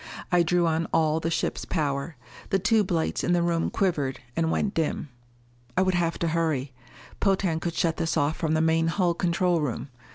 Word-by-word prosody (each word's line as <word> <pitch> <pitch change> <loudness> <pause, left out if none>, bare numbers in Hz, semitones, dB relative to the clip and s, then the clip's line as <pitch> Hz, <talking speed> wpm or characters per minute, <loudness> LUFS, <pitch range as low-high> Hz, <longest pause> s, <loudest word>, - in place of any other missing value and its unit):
I 175 -1 +5
drew 175 +1 +2
on 165 0 0
all 160 -1 +2
the 165 - -2
ship's 165 - -1
power. 145 0 -2 0.3
The 195 - +3
tube 210 +1 +2
lights 165 -2 0
in 175 - +2
the 175 -1 +2
room 170 -1 +1
quivered 150 -9 0 0.2
and 165 -1 +1
went 200 +4 0
dim. 160 -2 -1 0.7
I 185 - +5
would 185 0 +1
have 170 -1 0
to 170 - +1
hurry. 155 -5 -1 0.5
Potan 190 -5 +1
could 170 0 -3
shut 165 -2 +1
this 165 - -1
off 145 +2 +1
from 160 -1 0
the 160 - +2
main 165 0 +2
hull 175 +1 +1
control 175 0 +1
room. 135 -2 -3
165 Hz, 195 wpm, -26 LUFS, 160-175 Hz, 0.7 s, I